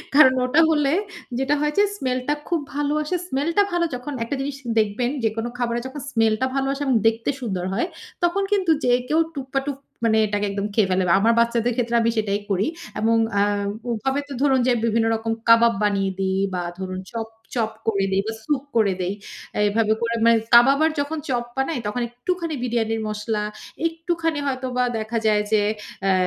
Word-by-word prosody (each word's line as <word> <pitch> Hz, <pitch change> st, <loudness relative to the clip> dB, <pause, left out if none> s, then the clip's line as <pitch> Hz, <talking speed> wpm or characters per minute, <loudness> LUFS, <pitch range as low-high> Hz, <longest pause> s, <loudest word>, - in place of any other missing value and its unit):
কারণ 265 Hz, -4 st, +8 dB
ওটা 290 Hz, +6 st, +4 dB
হলে 295 Hz, -2 st, +2 dB, 0.5 s
যেটা 270 Hz, +2 st, +2 dB
হয় 300 Hz, 0 st, +1 dB
যে, 405 Hz, -, +6 dB
স্মেলটা 255 Hz, -1 st, -1 dB
খুব 340 Hz, -2 st, +1 dB, 0.2 s
ভালো 290 Hz, 0 st, 0 dB
আসে। 360 Hz, +4 st, -2 dB
স্মেলটা 325 Hz, +9 st, +2 dB
ভালো 345 Hz, -1 st, +1 dB
যখন 250 Hz, +4 st, -6 dB
একটা 235 Hz, -, -3 dB
জিনিস 275 Hz, 0 st, -4 dB, 0.2 s
দেখবেন, 220 Hz, +4 st, 0 dB
যেকোনো 225 Hz, +2 st, -1 dB
খাবারে 240 Hz, -1 st, -1 dB
যখন 275 Hz, +2 st, -7 dB
স্মেলটা 225 Hz, 0 st, +2 dB
ভালো 270 Hz, 0 st, 0 dB
আসে 275 Hz, +1 st, -4 dB
এবং 265 Hz, -3 st, +2 dB
দেখতে 225 Hz, 0 st, 0 dB
সুন্দর 190 Hz, -7 st, -2 dB
হয়, 240 Hz, -, 0 dB, 0.4 s
তখন 370 Hz, +3 st, +2 dB
কিন্তু 380 Hz, -5 st, +2 dB
যে 245 Hz, -, +3 dB, 0.2 s
কেউ 315 Hz, -, +3 dB, 0.2 s
টুপা 270 Hz, 0 st, -2 dB
টুপ 280 Hz, -2 st, -3 dB, 0.3 s
মানে 220 Hz, -1 st, +3 dB
এটাকে 205 Hz, 0 st, -1 dB
একদম 200 Hz, 0 st, -2 dB
খেয়ে 205 Hz, -3 st, +2 dB
ফেলে 185 Hz, 0 st, +2 dB
বা 170 Hz, -, +4 dB
আমার 225 Hz, +3 st, +4 dB
বাচ্চাদের 235 Hz, 0 st, +2 dB
ক্ষেত্রে 235 Hz, -1 st, 0 dB
আমি 230 Hz, -, +2 dB
সেটাই 205 Hz, -2 st, 0 dB
করি। 195 Hz, +2 st, +1 dB, 0.3 s
এবং 225 Hz, +1 st, +3 dB, 0.2 s
আ -, -, +4 dB, 0.5 s
ওভাবে 265 Hz, +5 st, -1 dB
তো 285 Hz, -, -7 dB
ধরুন 270 Hz, -2 st, +4 dB
যে -, -, +4 dB
বিভিন্ন 225 Hz, 0 st, +2 dB
রকম 225 Hz, 0 st, -3 dB, 0.2 s
কাবাব 230 Hz, 0 st, +7 dB
বানিয়ে 195 Hz, -2 st, +1 dB
দেই 190 Hz, 0 st, 0 dB
বা 180 Hz, -, -1 dB, 0.2 s
ধরুন 185 Hz, 0 st, -4 dB
চপ, 225 Hz, -1 st, -4 dB, 0.3 s
চপ 225 Hz, -2 st, 0 dB, 0.2 s
করে 195 Hz, -3 st, +2 dB
দেই 190 Hz, 0 st, +2 dB
বা 225 Hz, -, -2 dB
সুপ 280 Hz, -1 st, -1 dB
করে 210 Hz, -4 st, +3 dB
দেই। 180 Hz, +2 st, -1 dB, 0.6 s
এভাবে 220 Hz, +1 st, +2 dB
করে 230 Hz, 0 st, 0 dB
মানে 230 Hz, 0 st, +6 dB, 0.2 s
কাবাব 255 Hz, +4 st, +7 dB
আর 320 Hz, -, +2 dB
যখন 290 Hz, +3 st, -2 dB
চপ 240 Hz, -2 st, 0 dB
বানাই 270 Hz, 0 st, 0 dB
তখন 245 Hz, +4 st, -2 dB
একটুখানি 330 Hz, +6 st, -3 dB
বিরিয়ানির 225 Hz, -2 st, 0 dB
মসলা, 210 Hz, 0 st, -2 dB, 0.4 s
একটুখানি 330 Hz, -1 st, -2 dB
হয়তোবা 255 Hz, -2 st, -1 dB
দেখা 220 Hz, +1 st, -3 dB
যায় 210 Hz, -1 st, +4 dB
যে 215 Hz, -, +4 dB, 0.4 s
অ্যা 195 Hz, -1 st, +3 dB
235 Hz, 190 wpm, -23 LUFS, 220-280 Hz, 0.6 s, কারণ